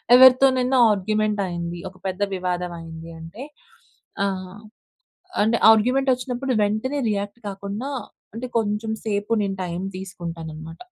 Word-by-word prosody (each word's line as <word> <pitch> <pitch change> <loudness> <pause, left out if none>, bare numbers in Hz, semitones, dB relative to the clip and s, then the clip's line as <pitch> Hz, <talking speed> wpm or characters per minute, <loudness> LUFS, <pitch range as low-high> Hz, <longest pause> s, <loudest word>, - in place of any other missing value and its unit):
ఎవరితోనైనా 260 0 +6
ఆర్గ్యుమెంట్ 210 +1 0
అయింది, 170 -1 -4
ఒక 185 - -21
పెద్ద 190 +1 -4
వివాదం 180 -1 -2
అయింది 165 0 -9
అంటే 165 +10 -9 0.8
ఆహ్, 190 0 -3 0.8
అంటే 225 +2 +3
ఆర్గ్యుమెంట్ 250 +5 +4
వచ్చినప్పుడు 255 +1 -2
వెంటనే 220 +7 0
రియాక్ట్ 205 +2 -3
కాకుండా, 200 +6 -5 0.5
అంటే 235 +3 -4
కొంచెం 215 0 -1
సేపు 205 0 -1
నేను 195 -1 -2
టైం 175 0 -4 0.2
తీసుకుంటాను 170 -4 -6
అన్నమాట. 160 +1 -9
205 Hz, 120 wpm, -23 LUFS, 180-235 Hz, 0.8 s, ఎవరితోనైనా